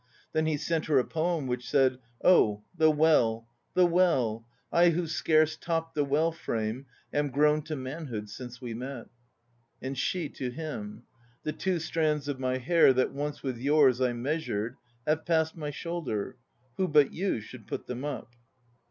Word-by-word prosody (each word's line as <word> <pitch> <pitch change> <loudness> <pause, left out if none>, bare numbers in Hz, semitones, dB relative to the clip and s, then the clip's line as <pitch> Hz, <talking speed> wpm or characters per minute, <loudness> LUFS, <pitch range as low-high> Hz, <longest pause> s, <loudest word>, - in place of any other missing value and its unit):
Then 155 0 +1
he 155 -2 +1
sent 160 +2 -1
her 150 -3 +3
a 130 - +5
poem 165 -2 -1
which 125 -1 -3
said: 130 -3 +3 0.2
"Oh, 105 - +5
the 160 -2 +5
well, 145 -8 +3 0.3
the 180 - +6
well! 135 -11 +2 0.2
I 175 +1 +5
who 170 +1 0
scarce 155 -1 +2
topped 165 0 -2
the 145 - +1
well 150 +4 +2
frame 115 -3 -3 0.3
Am 145 0 +1
grown 150 +3 +3
to 155 - -3
manhood 130 -5 -5
since 120 +3 -9
we 120 -3 -5
met." 125 +1 -6 0.7
And 135 +1 -4
she 175 +3 -1
to 125 - -4
him: 165 +10 -6 0.4
"The 155 - -2
two 190 -2 -1
strands 155 -3 0
of 140 -2 -3
my 130 0 0
hair 135 +2 +5
That 130 0 +1
once 145 +1 -4
with 130 -4 -3
yours 135 -2 +4
I 125 -1 +2
measured, 120 -4 -2 0.3
Have 155 +1 +1
passed 160 -1 +1
my 150 -3 -4
shoulder; 145 - -4 0.4
Who 190 - +1
but 150 -3 +4
you 185 - -1
should 110 +1 -12
put - - -5
them 125 +1 -5
up?" 145 -4 -5
145 Hz, 170 wpm, -29 LUFS, 125-160 Hz, 0.7 s, the